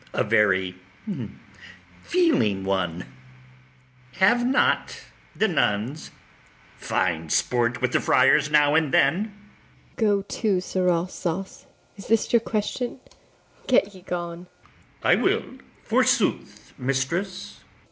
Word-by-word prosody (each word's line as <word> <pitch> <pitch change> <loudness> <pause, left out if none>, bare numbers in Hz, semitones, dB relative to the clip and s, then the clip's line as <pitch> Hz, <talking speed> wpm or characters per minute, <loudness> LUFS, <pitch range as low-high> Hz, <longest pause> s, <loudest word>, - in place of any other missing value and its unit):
A - - +1
very 95 -3 +2 1.3
feeling 290 - +2
one: 90 -3 -2 1.1
have 205 - +3
not 255 +2 +1 0.3
the 220 - +2
nuns 135 - -1 0.7
fine 85 -3 -2
sport 125 +4 0
with 125 - +1
the - - +2
friars 130 +4 +4
now 150 -1 +4
and 155 -3 +2
then? 160 +12 +3
ABIGAIL. 210 -2 -14 0.6
Go 205 -4 +2
to, 200 -1 -1
Sirrah 180 -1 0
Sauce! 185 +1 -5 0.3
is 195 - -11
this 225 +1 +1
your 235 - +6
question? 230 +4 -3 0.7
get 205 -5 +2
ye 185 - -14
gone. 175 0 -6 0.6
ITHAMORE. - - +3
I - - +7
will, - - +1 0.4
forsooth, - - 0
mistress. 135 +9 -3
170 Hz, 110 wpm, -24 LUFS, 125-200 Hz, 1.3 s, I